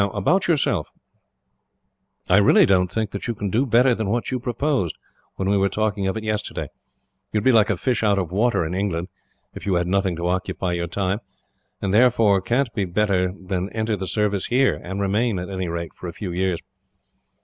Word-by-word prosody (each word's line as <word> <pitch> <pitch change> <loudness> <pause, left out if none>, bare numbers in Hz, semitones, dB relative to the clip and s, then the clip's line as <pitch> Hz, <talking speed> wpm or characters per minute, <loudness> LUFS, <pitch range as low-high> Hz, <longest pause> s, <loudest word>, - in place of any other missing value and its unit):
"Now, 100 - +2
about 175 - +2
yourself. 165 -4 +1 1.4
I 90 - +5
really 100 - +6
don't 90 -2 +2
think 110 -1 -2
that 100 - -5
you 120 - -2
can 100 -2 -3
do 125 +7 +1
better 125 +2 +4
than 110 -3 -2
what 120 +5 -1
you 130 - -1
proposed, 125 - -1 0.4
when 95 - -2
we 100 +1 +3
were 100 0 +2
talking 105 -1 -1
of 95 - -1
it 110 - -5
yesterday. 110 -1 -3 0.6
You - - 0
would 105 - 0
be 130 - +5
like 110 -2 +4
a 105 - +1
fish 125 +6 0
out 105 -2 +3
of 90 -3 -2
water, 110 -2 +1
in 80 - -4
England, 90 -2 -2 0.4
if - - -9
you 95 - +2
had 90 0 +1
nothing 95 0 0
to 85 +1 -4
occupy 90 0 -1
your 85 0 -2
time; 95 +3 -1 0.6
and 95 - 0
therefore 110 -4 +4
can't 120 +4 0
do 100 -4 0
better 90 -1 +1
than 95 0 -4
enter 110 -1 -1
the 95 -1 -5
Service 105 0 0
here, 130 +2 +2
and 95 +3 -5
remain, 105 +2 +1
at 90 +2 -5
any 95 -1 -3
rate, 85 0 -4
for 90 - -8
a 85 - -6
few 95 +1 -5
years. 90 0 0
100 Hz, 210 wpm, -22 LUFS, 90-110 Hz, 1.4 s, really